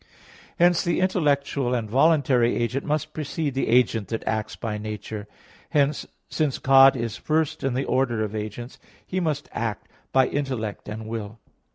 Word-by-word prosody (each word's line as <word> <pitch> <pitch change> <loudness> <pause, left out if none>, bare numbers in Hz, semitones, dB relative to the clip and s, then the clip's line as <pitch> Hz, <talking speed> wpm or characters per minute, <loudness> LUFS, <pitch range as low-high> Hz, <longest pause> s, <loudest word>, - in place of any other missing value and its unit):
Hence 175 0 +4
the 170 -3 0
intellectual 140 -8 +1
and 115 -3 -2
voluntary 130 -1 +3
agent 125 +3 -1
must 155 0 -2
precede 155 -1 -3
the 135 - -1
agent 115 -3 +3
that 115 - -5
acts 110 -1 -2
by 105 -2 -4
nature. 105 0 -6 0.4
Hence, 145 0 +1 0.2
since 150 -4 -1
God 135 0 +6
is 115 -2 -3
first 155 -1 -1
in 135 -2 0
the 135 - -1
order 120 -4 +1
of 105 0 -4
agents, 110 +4 -6 0.3
He 185 - -2
must 155 -4 -2
act 115 -2 -3 0.2
by 130 -1 +4
intellect 125 -8 -3
and 110 +1 -6
will. 110 -1 -5
130 Hz, 160 wpm, -24 LUFS, 110-145 Hz, 0.4 s, God